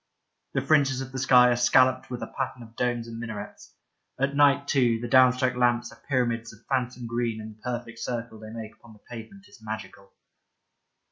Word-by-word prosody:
The 140 Hz, -, +1 dB
fringes 140 Hz, -3 st, +3 dB
of 130 Hz, 0 st, -7 dB
the 130 Hz, -, -4 dB
sky 125 Hz, -1 st, +6 dB
are -, -, +3 dB
scalloped 130 Hz, +1 st, +3 dB
with 125 Hz, -1 st, -5 dB
a -, -, -8 dB
pattern 130 Hz, -2 st, -3 dB
of 115 Hz, 0 st, -16 dB
domes 120 Hz, -1 st, -1 dB
and 115 Hz, 0 st, -7 dB
minarets. 115 Hz, -3 st, -8 dB, 0.4 s
At 140 Hz, +1 st, 0 dB
night, 140 Hz, 0 st, +4 dB
too, 120 Hz, -5 st, +2 dB
the 120 Hz, -, -4 dB
down 130 Hz, +1 st, +6 dB
struck 130 Hz, 0 st, 0 dB
lamps 120 Hz, -1 st, +1 dB
are -, -, -17 dB
pyramids 120 Hz, -3 st, 0 dB
of 110 Hz, +1 st, -19 dB
phantom 125 Hz, -2 st, -2 dB
green 115 Hz, -1 st, -2 dB
and 110 Hz, 0 st, -9 dB
the 110 Hz, -, -30 dB
perfect 120 Hz, -2 st, -5 dB
circle 115 Hz, -2 st, -4 dB
they 110 Hz, 0 st, -10 dB
make 110 Hz, -1 st, -8 dB
upon 115 Hz, 0 st, -17 dB
the 105 Hz, -, -19 dB
pavement 125 Hz, -, -10 dB
is 205 Hz, -, -18 dB
magical. 105 Hz, -2 st, -8 dB
120 Hz, 200 wpm, -26 LUFS, 115-130 Hz, 0.4 s, sky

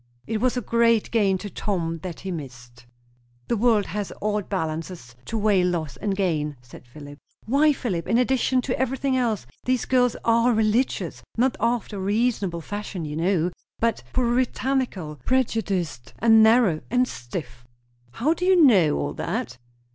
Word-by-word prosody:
"It 220 Hz, -1 st, -2 dB
was 255 Hz, 0 st, +1 dB
a -, -, 0 dB
great 230 Hz, 0 st, +2 dB
gain 200 Hz, -4 st, +2 dB
to 205 Hz, +2 st, -7 dB
Tom 165 Hz, -5 st, -2 dB
that 170 Hz, 0 st, -7 dB
he 190 Hz, -, -5 dB
missed." 125 Hz, -6 st, -9 dB, 0.6 s
"The -, -, +2 dB
world 220 Hz, -2 st, +3 dB
has 205 Hz, +2 st, -4 dB
odd 210 Hz, -1 st, -2 dB
balances 160 Hz, -7 st, -4 dB
to 225 Hz, -, -3 dB
weigh 205 Hz, -3 st, +3 dB
loss 170 Hz, -5 st, -1 dB
and 200 Hz, -1 st, -2 dB
gain!" 155 Hz, -7 st, -1 dB
said 120 Hz, 0 st, -15 dB
Philip. 145 Hz, +3 st, -12 dB, 0.3 s
"Why, 285 Hz, +6 st, +4 dB
Philip, 195 Hz, -, -3 dB
in 230 Hz, -, +2 dB
addition 255 Hz, 0 st, +2 dB
to 255 Hz, -, -2 dB
everything 265 Hz, +1 st, 0 dB
else, 230 Hz, -, 0 dB, 0.2 s
these 255 Hz, -1 st, +1 dB
girls 250 Hz, -2 st, +2 dB
are 235 Hz, +1 st, +4 dB
religious; 220 Hz, +3 st, 0 dB, 0.2 s
not 255 Hz, +2 st, +2 dB
after 230 Hz, -3 st, -1 dB
a -, -, -4 dB
reasonable 200 Hz, -3 st, 0 dB
fashion, 205 Hz, -2 st, -5 dB
you 150 Hz, 0 st, -5 dB
know, 175 Hz, +1 st, +1 dB, 0.3 s
but 230 Hz, 0 st, 0 dB
puritanical; 250 Hz, -, -1 dB
prejudiced, 200 Hz, -, -1 dB
and 225 Hz, -1 st, +6 dB
narrow, 220 Hz, -7 st, +4 dB
and 250 Hz, +1 st, +2 dB
stiff." 120 Hz, -, -7 dB, 0.5 s
"How 290 Hz, +8 st, +1 dB
do 350 Hz, -, -6 dB
you 370 Hz, 0 st, +5 dB
know 195 Hz, -, +5 dB
all 145 Hz, -, -2 dB
that?" 220 Hz, -, -4 dB
210 Hz, 160 wpm, -24 LUFS, 165-245 Hz, 0.6 s, and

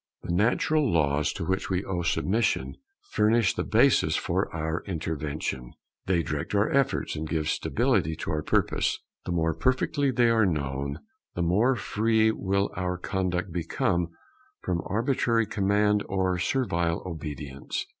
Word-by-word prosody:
The -, -, -2 dB
natural 125 Hz, -, +2 dB
laws 75 Hz, -2 st, +2 dB
to -, -, -4 dB
which 95 Hz, +3 st, -1 dB
we 95 Hz, +1 st, -1 dB
owe 90 Hz, -2 st, -2 dB
submission 95 Hz, +6 st, 0 dB, 0.3 s
furnish 110 Hz, 0 st, +3 dB
the -, -, -2 dB
basis -, -, +3 dB
for -, -, -1 dB
our 80 Hz, +1 st, -2 dB
intervention; 75 Hz, -7 st, -4 dB, 0.3 s
they 90 Hz, -3 st, +2 dB
direct 75 Hz, +7 st, -3 dB
our 100 Hz, +2 st, +2 dB
efforts 140 Hz, -1 st, +1 dB
and 75 Hz, 0 st, -4 dB
give 80 Hz, -2 st, -1 dB
stability 80 Hz, +1 st, +1 dB
to 80 Hz, -, -4 dB
our 75 Hz, -1 st, -1 dB
purpose. -, -, +1 dB, 0.3 s
The -, -, -1 dB
more 80 Hz, -1 st, +1 dB
perfectly 135 Hz, -, +1 dB
they 120 Hz, -2 st, +3 dB
are 115 Hz, -1 st, +4 dB
known, 70 Hz, -4 st, -2 dB, 0.3 s
the 85 Hz, -, 0 dB
more 105 Hz, +10 st, +3 dB
free 110 Hz, -1 st, +2 dB
will 100 Hz, -1 st, 0 dB
our 90 Hz, 0 st, -2 dB
conduct 90 Hz, -1 st, -2 dB
become 85 Hz, +1 st, 0 dB, 0.6 s
from 85 Hz, -2 st, -1 dB
arbitrary 115 Hz, +1 st, +1 dB
command 105 Hz, 0 st, +2 dB
or 95 Hz, -1 st, 0 dB
servile 85 Hz, -8 st, 0 dB
obedience. 75 Hz, -5 st, -5 dB
90 Hz, 145 wpm, -27 LUFS, 80-110 Hz, 0.6 s, are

